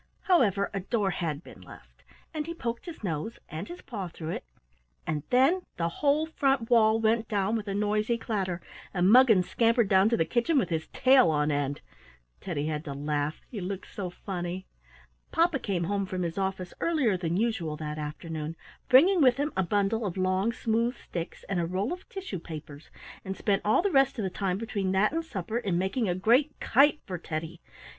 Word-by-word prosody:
However, 205 - +2
a 195 - -1
door 200 0 0
had 165 -3 -3
been - - -13
left, - - -15 0.3
and 305 -1 -3
he 335 - -5
poked 235 0 -4
his 330 -9 -8
nose 170 +4 -3
and 160 +5 -5
his 350 - -9
paw 200 -7 -5
through 160 -1 -7
it, - - -4 0.6
and 155 -2 -1
then 270 +9 +4 0.2
the 170 -1 0
whole 290 - +1
front 270 -6 0
wall 220 -1 +5
went 225 0 +2
down 205 +1 0
with 215 -2 -3
a 195 - -2
noisy 210 +3 +1
clatter, 195 -6 -2 0.3
and 180 +2 +4
Muggins 230 -7 +6
scampered 230 -2 +2
down 190 +2 +5
to 230 - +2
the 165 - +2
kitchen 250 - +1
with 190 -10 +2
his 160 -2 -2
tail 255 -7 +5
on 150 -1 +1
end. 145 0 -1 0.6
Teddy 150 -6 -3
had 155 -1 -2
to 140 - -4
laugh; 145 +1 -2
he 215 -6 -5
looked 190 +1 -6
so 190 -3 -4
funny. 180 0 -5 0.7
Papa 330 -3 +2
came 190 -7 -1
home 200 +2 -1
from 185 -1 -3
his 170 -1 -3
office 190 -2 -3
earlier 295 - +2
than 175 -1 -1
usual 200 -9 -1
that 150 0 -5
afternoon, 155 +1 -5 0.3
bringing 340 +8 +6
with 255 -2 +5
him 290 +2 -1
a 190 - +2
bundle 205 +4 0
of 190 -3 -3
long, 185 +4 +1
smooth 230 +2 0
sticks 170 -1 -6
and 190 -2 -1
a 170 - 0
roll 190 - -1
of 365 - -10
tissue 375 - -5
papers, 155 -2 -9 0.3
and 190 0 -5
spent 200 -2 +1
all 215 +11 +3
the 400 - +1
rest 270 -2 +3
of 220 - -2
the 190 - -2
time 190 -1 -1
between 200 -3 -2
that 195 +3 +3
and 330 +2 -1
supper 220 - -3
in 195 -7 -1
making 190 +4 0
a 175 - +1
great 245 +10 +2
kite 290 +5 +4
for 180 -3 -5
Teddy. 160 +1 -5
200 Hz, 200 wpm, -28 LUFS, 175-235 Hz, 0.7 s, Muggins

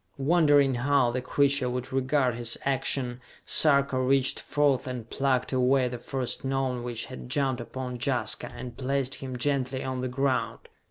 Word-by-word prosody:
Wondering 145 -2 +4
how 130 0 +2
the 125 +1 -2
creature 140 0 +2
would 125 +1 -4
regard 130 -1 +1
his 120 0 -1
action, 130 -2 -1 0.2
Sarka 140 -3 +3
reached 130 0 +2
forth 145 -3 +1
and 125 -3 -5
plucked 135 0 0
away 130 0 +3
the 120 -1 -6
first 130 0 -3
Gnome 135 -2 -1
which 120 -1 -4
had 130 -1 -9
jumped 130 -2 +1
upon 125 0 -6
Jaska, 120 -5 0
and 120 0 -8
placed 135 0 -1
him 130 -2 -6
gently 130 0 -1
on 130 -1 -3
the 130 - -2
ground. 130 +1 -1
130 Hz, 160 wpm, -27 LUFS, 125-140 Hz, 0.2 s, Wondering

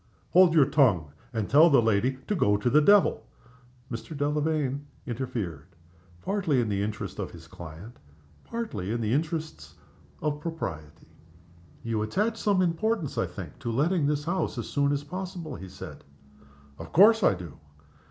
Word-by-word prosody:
"Hold 180 -2 +6
your 150 -4 +7
tongue, 100 - +2 0.2
and 110 -4 -2
tell 155 +4 +6
the 140 - +6
lady 115 +3 +1
to - - -1
go 105 - +2
to 120 +4 0
the 150 - +6
devil!" 195 - +4 0.6
Mr. 125 +6 -6
Delamayn 145 -1 -1 0.2
interfered 110 - -4 0.6
partly 190 -9 +1
in 115 -3 0
the 100 -1 0
interests 105 +1 -4
of - - -3
his - - -13
client, 85 +7 -10 0.5
partly 115 - -4
in 120 - -1
the 110 0 0
interests 155 +2 -3 0.4
of 150 -1 -2
propriety. 85 - -6 0.7
"You 115 -2 -1
attach 210 - 0
some 200 -3 +2
importance, 175 - -1
I - - 0
think, - - -9
to 115 - -3
letting 150 +5 +1
this 145 0 0
house 175 +4 -2
as - - -3
soon 140 0 +1
as 145 0 -1
possible?" 180 0 -6
he 95 +1 -9
said. - - -10 0.8
"Of 80 0 -9
course 220 +5 +6
I 140 - +4
do!" 85 -5 -10
145 Hz, 160 wpm, -27 LUFS, 110-165 Hz, 0.8 s, your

